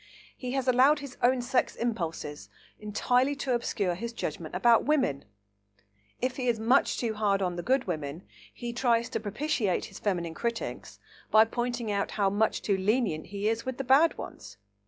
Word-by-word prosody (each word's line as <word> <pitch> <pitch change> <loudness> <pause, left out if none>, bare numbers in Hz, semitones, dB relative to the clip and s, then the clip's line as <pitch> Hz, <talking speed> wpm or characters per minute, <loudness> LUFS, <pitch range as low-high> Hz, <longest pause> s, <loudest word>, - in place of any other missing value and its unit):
He 250 -1 -5
has 265 -1 -1
allowed 260 +4 +5
his 280 -3 -8
own 250 0 +3
sex 250 +1 0
impulses 165 -10 -4 0.3
entirely 245 +6 +1
to 270 -2 -1
obscure 205 -6 0
his 230 +7 -5
judgment 160 -5 -5
about 230 +5 +5
women. 260 - +1 0.9
If 255 0 -2
he 255 -2 -2
is 235 -2 +1
much 240 +5 +3
too 230 -3 -1
hard 205 -2 +1
on 180 -2 -1
the 175 - -3
good 260 +6 +2
women, 155 -1 -4 0.3
he 240 -1 -6
tries 235 -2 +1
to - - -2
propitiate 215 - -1
his - - -11
feminine 175 -5 -1
critics 235 +6 -4 0.3
by 220 0 +7
pointing 240 -1 -2
out 200 -1 0
how 200 -2 +2
much 215 +2 +1
too 200 -2 +1
lenient 200 -5 0
he 200 +1 -3
is 225 +1 0
with 260 -1 -4
the 270 - -2
bad 275 +6 +4
ones. 100 -1 -9
230 Hz, 180 wpm, -28 LUFS, 195-255 Hz, 0.9 s, by